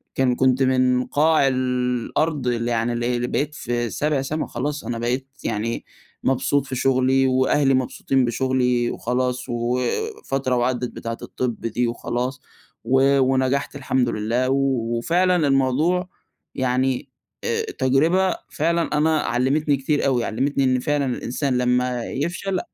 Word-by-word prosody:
كان 125 -2 +2
كنت 130 +1 +3
من 130 -1 +2
قاع 155 -1 +3
الأرض 130 +3 -1
اللي 120 0 0
يعني 115 +1 0
اللي 120 +1 -1
اللي 120 0 -1
بقيت 150 +3 -2
في 120 -4 -2
سابع 145 +3 0
سما 155 +3 -3
خلاص، 145 +5 -3
أنا 120 - -3
بقيت 125 +3 -1 0.2
يعني 115 +1 -2 0.4
مبسوط 135 +1 +1
في 130 - -5
شغلي 130 +1 +2
وأهلي 130 +2 +3
مبسوطين 130 0 +1
بشغلي، 125 0 +1
وخلاص 125 +1 -2
وفترة 125 - -1
وعدت 125 0 0
بتاعة 115 0 -5
الطب 125 -3 -3
دي 120 +2 -1
وخلاص، 125 +3 -3 0.4
و 135 +3 +3
ونجحت 130 +2 +1
الحمد 130 -3 0
لله 115 +4 0
وفعلًا 135 +6 +1
الموضوع 145 +7 +1 0.5
يعني 130 0 0 0.3
آآ 460 -1 0 0.2
تجربة 160 +8 +3
فعلًا 165 -1 0
أنا 155 0 +3
علمتني 140 +4 +1
كتير 145 +2 0
أوي، 125 -3 +1
علمتني 135 +4 0
إن 130 -1 +2
فعلًا 145 +2 0
الإنسان 125 +1 -1
لمّا 125 -1 0
يفشل 180 +6 -2
130 Hz, 130 wpm, -22 LUFS, 125-140 Hz, 0.5 s, كنت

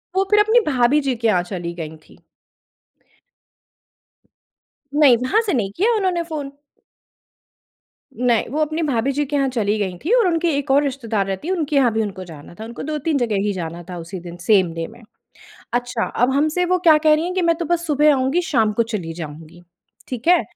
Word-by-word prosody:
वो 385 - +3
फिर 420 - +6
अपनी 440 +3 +5
भाभी 265 +1 +3
जी 270 -3 -1
के 230 0 -1
यहाँ 185 -5 +3
चली 175 -2 -5
गई 160 -2 -7
थी। - - -21 2.7
नहीं, 285 -5 +6
वहाँ 255 - +1
से 420 -5 -2
नहीं 205 -7 -1
किया 450 +6 +2
उन्होंने 370 -5 0
फ़ोन। 300 -4 -6 1.7
नहीं, 240 -2 +1
वो 300 - -2
अपनी 310 +2 -1
भाभी 270 -2 0
जी 290 +2 -1
के 290 +1 -4
यहाँ 275 -1 +2
चली 215 -4 0
गई 185 -3 -2
थी, 345 - -3
और 470 -6 +4
उनके 340 0 +1
एक 275 -1 -2
और 285 +2 +4
रिश्तेदार 235 -7 -2
रहती 195 - -4
हैं, 375 - 0
उनके 305 -4 -2
यहाँ 260 -4 +4
भी 220 - +1
उनको 195 -3 -4
जाना 160 -2 -12
था। 220 - -6
उनको 235 +1 -8
2-3 305 +1 -1
जगह 235 -5 0
ही 205 - 0
जाना 170 -1 -6
था 180 - -6
उसी 175 +3 -7
दिन, 175 0 -9
सेम 180 -2 +2
डे 165 0 -4
में। 235 +2 -15 0.7
अच्छा, 245 -1 -1
अब 245 +2 +1
हमसे 310 +6 +1
वो 365 +1 +1
क्या 330 -3 +6
कह 310 0 +4
रही 310 +2 0
हैं 365 +1 -3
कि 370 - 0
"मैं 335 -1 +3
तो 340 - -3
बस 340 +1 -1
सुबह 300 0 +4
आऊँगी 270 +6 +1
शाम 225 -10 +1
को 230 - +1
चली 210 -8 -4
जाऊँगी।" 160 +1 -9 0.5
ठीक 250 0 -6
है। 355 0 +5
260 Hz, 205 wpm, -20 LUFS, 205-310 Hz, 2.7 s, फिर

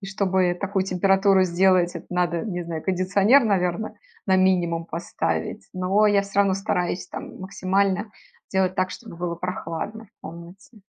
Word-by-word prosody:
и 195 - -8
чтобы 190 -2 +1
такую 195 -1 0
температуру 195 +1 +3
сделать, 180 0 +3
это - - -10
надо, 175 -2 0
не 180 -5 -3
знаю, 165 -2 -5
кондиционер, 195 +7 +3
наверно, 195 +1 0 0.3
на 190 -1 +4
минимум 175 -3 +2
поставить. 170 +2 -3
Но 190 +3 +2
я 205 -1 +3
всё 200 0 0
равно 195 -1 +3
стараюсь 180 -2 -2
там - - -8
максимально 195 +2 0 0.4
делать 190 -1 +1
так, 185 0 0
чтобы 170 - -10
было 175 0 -3
прохладно 180 +5 -5
в 215 - -39
комнате. 175 +7 -12
185 Hz, 155 wpm, -24 LUFS, 180-200 Hz, 0.4 s, на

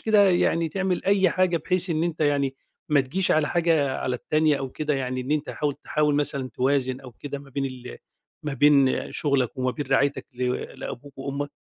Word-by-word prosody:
كده 210 -3 +5
يعني 165 -2 +2
تعمل 190 0 -1
أي 195 -2 +4
حاجة 185 -1 +2
بحيث 180 +3 0
إن 160 0 +1
أنت 170 -2 -2
يعني 140 -2 +1 0.3
ما 150 -2 +4
تجيش 165 +8 -1
على 155 -1 +3
حاجة 160 -5 +2
على 125 -1 -1
التانية 155 +3 +2
أو 135 -1 -4
كده 150 -1 -2
يعني 130 -1 -2
إن 130 - -6
أنت 150 0 0
حاول 145 -2 -2
تحاول 150 0 0
مثلًا 140 -2 -1
توازِن 130 -1 +1
أو 125 -3 -11
كده 140 +3 -6
ما 140 0 -14
بين 135 +1 -2
ال 125 - -7 0.5
ما 150 - -3
بين 140 -1 +3
شُغلك 140 -3 0
وما 130 0 +1
بين 145 +1 -5
رعايتك 135 +1 +1
ل 125 0 0 0.3
لأبوك 140 +3 -8
وأمك؟ 140 +1 -4
145 Hz, 195 wpm, -25 LUFS, 135-160 Hz, 0.5 s, كده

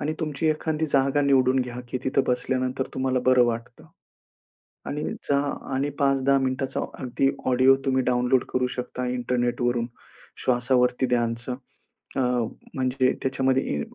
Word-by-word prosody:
आणि 155 +2 -1
तुमची 155 0 -2
एखादी 155 0 0
जागा 140 0 +2
निवडून 130 -2 +3
घ्या 125 -1 -4
की 130 - -2
तिथं 130 +1 +2
बसल्यानंतर 130 +1 -1
तुम्हाला 130 -1 0
बरं 130 -1 +6
वाटतं. 120 0 -4 1.0
आणि 150 +1 -3 0.3
जा 140 - +4 0.4
आणि 135 +2 0
5-10 135 -1 +3
मिनिटाचा 130 0 -1 0.2
अगदी 130 +1 +1 0.2
ऑडिओ 130 +1 +5
तुम्ही 130 -1 +2
डाउनलोड 125 +1 +2
करू 125 0 +2
शकता 125 0 -4
इंटरनेटवरून, 120 -1 0 0.6
श्वासावरती 125 0 +2
ध्यानचं. 120 0 -1 0.6
अ, - - +2 0.5
म्हणजे 130 -1 +1
त्याच्यामध्ये 130 0 +1
इ 75 - -2
130 Hz, 130 wpm, -25 LUFS, 125-135 Hz, 1.0 s, बरं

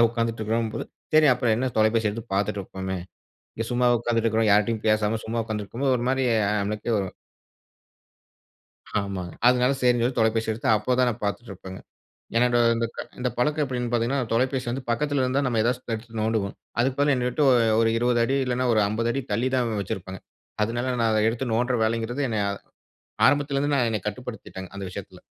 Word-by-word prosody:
சும்மாதான் 115 - +6
உட்காந்துட்டு 115 -1 -2
இருக்கிறோம்னு 110 +1 -1
போது, - - -3 0.3
சரி 155 0 +7
அப்புறம் 120 -3 +1
என்ன 130 +2 -1
தொலைபேசி 110 0 +3
எடுத்து 115 +3 -5
பார்த்துட்டுருப்போமே. 95 -2 -2 0.6
இங்க 115 - -2
சும்மா 125 0 +2
உட்காந்துட்டு 115 -1 0
இருக்கிறோம். 110 0 +2
யார்ட்டயும் 105 +2 +2
பேசாம 110 0 +2
சும்மா 115 +1 -1
உட்காந்துருக்கும்போது 115 +5 -1
ஒரு 120 - -3
மாரி 135 0 +1 0.3
ஆ - - +1
நம்மளுக்கே 105 +3 -2
ஒரு 95 - -2 1.9
ஆமாங்க. 95 -3 -5 0.2
அதுனால 125 +1 +3
சரின்னு 125 -1 +3
சொல்லி 125 +1 -1
தொலைபேசி 110 0 +2
எடுத்து 110 - -3
அப்போ 105 +4 0
தான் 125 -1 +4
நான் 115 -1 -7
பார்த்துட்டு 105 +3 -3
இருப்பேங்க. 95 0 -9 0.6
என்னட்ட 120 +1 +3 0.2
இந்த 115 0 0
க 125 0 -4
பழக்கம் 150 +4 +1
எப்டின்னு 125 -3 -3
பார்த்தீங்கன்னா, 120 +3 +1
தொலைபேசி 130 +2 0
வந்து 130 +2 -4
பக்கத்துல 140 +4 +1
இருந்தா, 130 +2 +1
நம்ம 120 -3 0
ஏதாச்சு 125 +2 0
எடுத்து 115 +1 -9
நோண்டுவோம். 110 -3 -1 0.2
அதுக்கு 130 +2 +1
பதிலா 145 -1 +4
என்ன 125 -1 0
விட்டு 150 +5 0
ஒ - - +6 0.3
ஒரு 115 - +3
20 120 0 +2
அடி 135 +4 +1
இல்லனா, 125 0 0
ஒரு 110 - +3
50 115 +3 -1
அடி 135 - -2
தள்ளி 125 +3 +1
தான் 120 -4 0
வச்சிருப்பாங்க. 95 -2 -6 0.4
அதுனால 120 +4 -1
நான் 115 -1 +3
அத 110 -1 +2
எடுத்து 120 +1 -3
நோண்ட்ற 120 +2 +1
வேலைங்கிறது, 115 +4 -1
என்னைய 105 -3 0 0.8
ஆரம்பத்துல 145 -1 +2
இருந்து 145 -2 +1
என்னைய 105 -4 -2
கட்டுப்படுத்திட்டங்க 105 -4 -7
அந்த 100 - -5
விஷயத்துல. 90 - -9
115 Hz, 180 wpm, -25 LUFS, 110-125 Hz, 1.9 s, சரி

